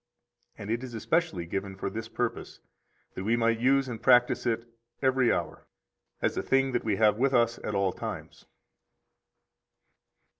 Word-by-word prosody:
And 100 - -6
it 120 +2 -1
is 125 -3 -7
especially 110 - 0
given 95 +3 -4
for 95 - -4
this 110 +3 -5
purpose, 120 0 -4 0.5
that 95 - -5
we 110 +4 +2
might 115 -1 +1
use 135 +2 +3
and 115 -3 -6
practise 125 -1 +4
it 115 0 -1 0.3
every 130 -2 +3
hour, - - -3 0.6
as - - +1
a - - -1
thing 135 0 +2
that 120 - -1
we 105 -3 0
have 105 +1 +3
with 135 0 +2
us 120 -1 +2
at 105 - -3
all 95 -2 +1
times. - - -7
115 Hz, 160 wpm, -28 LUFS, 105-130 Hz, 0.6 s, practise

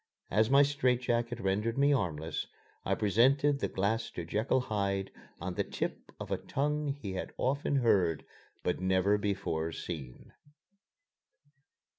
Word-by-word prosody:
As 110 +3 +3
my 140 +1 +7
strait 130 -3 +1
jacket 120 -1 0
rendered 105 +3 0
me 140 +1 +4
armless, 80 - -2 0.4
I - - +1
presented 135 +7 +3
the - - 0
glass 110 +4 -1
to 85 - -4
Jekyll 110 +9 +1
Hyde 100 -4 -1 0.3
on 90 +1 -4
the - - 0
tip - - -4
of - - -7
a - - 0
tongue 150 +2 -1
he 135 -9 -4
had 95 - -4
often 140 +2 0
heard, 95 - +2 0.4
but 90 - 0
never 95 +2 +2
before 100 -6 -1
seen. 75 -7 -7
105 Hz, 140 wpm, -31 LUFS, 95-130 Hz, 0.4 s, my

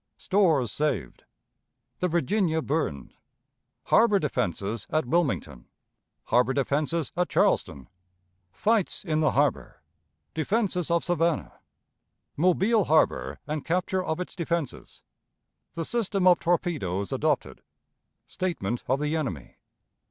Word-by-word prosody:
Stores 165 - +2
saved. 135 - -2 0.7
The 180 - +1
Virginia 170 -1 +1
burned. 135 - -2 0.7
Harbor 220 -3 +4
Defenses 105 - -2
at 155 -3 0
Wilmington. 120 - -1 0.6
Harbor 125 +3 +2
Defenses 145 +3 0
at 180 +1 0
Charleston. 70 - +1 0.6
Fights 210 - 0
in 155 -3 0
the 155 -2 +2
Harbor. 145 - 0 0.5
Defenses 180 +1 0
of 170 0 +2
Savannah. 170 -3 -1 0.8
Mobile 190 +6 +3
Harbor 155 +1 +2
and 150 -1 -3
Capture 185 +2 0
of 160 -1 -2
its 180 - -5
Defenses. 170 -5 -4 0.7
The 165 - -3
System 200 -4 0
of 180 -2 +6
Torpedoes 145 - -1
adopted. - - -1 0.6
Statement 120 - -3
of 130 +2 +1
the 150 +1 -1
Enemy. 115 - -4
160 Hz, 105 wpm, -26 LUFS, 135-180 Hz, 0.8 s, of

